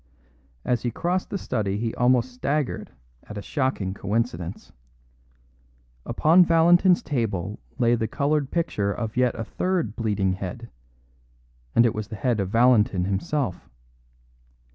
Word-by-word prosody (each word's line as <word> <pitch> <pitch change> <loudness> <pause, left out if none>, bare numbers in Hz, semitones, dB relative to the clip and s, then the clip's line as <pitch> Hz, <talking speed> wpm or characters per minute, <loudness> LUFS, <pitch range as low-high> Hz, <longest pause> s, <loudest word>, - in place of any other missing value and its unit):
As 120 -2 +1
he 120 - -1
crossed 175 +9 -2
the 200 - -2
study 105 - -2
he 115 +1 -2
almost 125 0 +2
staggered 140 +2 -2 0.4
at 105 - -9
a - - -4
shocking 130 -10 -1
coincidence. 100 -3 -3 1.4
Upon 160 +9 +5
Valentin's 175 +2 +4
table 105 - -2 0.2
lay 120 0 +3
the 110 -2 0
coloured 145 +1 0
picture 105 -12 -1
of 110 +1 -4
yet 125 -1 +2
a - - -1
third 170 - -2
bleeding 100 -4 0
head; 100 +6 -7 1.0
and 115 - +6
it 115 - +2
was 110 -1 -4
the 110 - -7
head 120 0 0
of 95 -2 -1
Valentin 110 -5 +3
himself. 100 +3 -2
120 Hz, 135 wpm, -24 LUFS, 105-140 Hz, 1.4 s, and